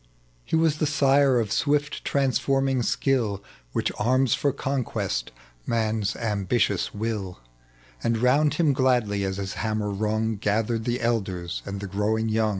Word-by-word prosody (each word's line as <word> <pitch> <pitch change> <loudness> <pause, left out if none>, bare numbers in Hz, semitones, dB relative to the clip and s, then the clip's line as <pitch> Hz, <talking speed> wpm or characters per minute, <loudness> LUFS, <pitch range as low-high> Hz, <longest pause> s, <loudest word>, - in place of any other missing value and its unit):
He - - -2
was 160 -2 +2
the 155 - +1
sire 140 -2 +4
of 110 -3 -2
swift 145 +4 0
transforming 135 -1 +1
sldll, 120 -5 0 0.3
Which - - -1
arms 130 +3 +3
for 140 - +1
conquest 135 -1 -2 0.4
man's 110 -2 0
ambitious 105 -2 0
wiU; 105 -4 -4 0.7
And 115 -1 +1
round 145 +6 +3
bim 155 -5 +3
gladly, 120 -6 +1
as 95 0 -2
his 95 -1 -4
hammer 110 -2 -1
rung, 110 +2 -1
Gathered 110 +2 0
the 120 0 -1
elders 95 -7 -2
and 100 0 -4
the - - -4
growing 110 +3 0
young 110 0 +2
115 Hz, 145 wpm, -25 LUFS, 105-135 Hz, 0.7 s, sire